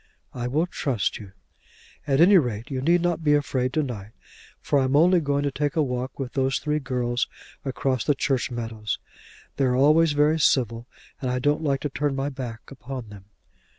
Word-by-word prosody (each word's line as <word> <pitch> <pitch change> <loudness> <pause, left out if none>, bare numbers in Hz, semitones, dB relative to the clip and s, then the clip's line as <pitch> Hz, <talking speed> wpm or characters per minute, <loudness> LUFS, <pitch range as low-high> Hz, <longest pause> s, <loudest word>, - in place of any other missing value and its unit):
"I 120 -1 -3
will 150 +7 +1
trust 135 - -2
you." 100 -3 -11 0.7
"At 135 -1 +2
any 185 +3 +7
rate 120 -3 -3
you 130 -1 -2
need 170 +5 +3
not 175 -2 0
be 150 -1 +4
afraid 130 -3 0
to 155 - +1
night, 110 -5 -6 0.5
for 145 - +1
I 135 - +2
am 130 +2 +1
only 175 +4 +5
going 145 -1 0
to 140 - 0
take 145 +4 -2
a 155 - +3
walk 125 -1 -3
with 135 -3 -5
those 135 -1 +1
three 150 0 -1
girls 125 -2 -1 0.4
across 130 -2 -1
the 145 - +2
church 135 -2 0
meadows. 115 -3 -4 0.6
They're 130 -2 +2
always 150 +4 +4
very 150 +2 +3
civil, 120 -5 +1 0.3
and 130 - -1
I 125 - 0
don't 145 +4 +1
like 140 -3 0
to 145 - -2
turn 145 0 -1
my 135 +1 -1
back 125 -5 -6
upon 130 -3 -7
them." 100 -2 -12
135 Hz, 195 wpm, -25 LUFS, 125-150 Hz, 0.7 s, any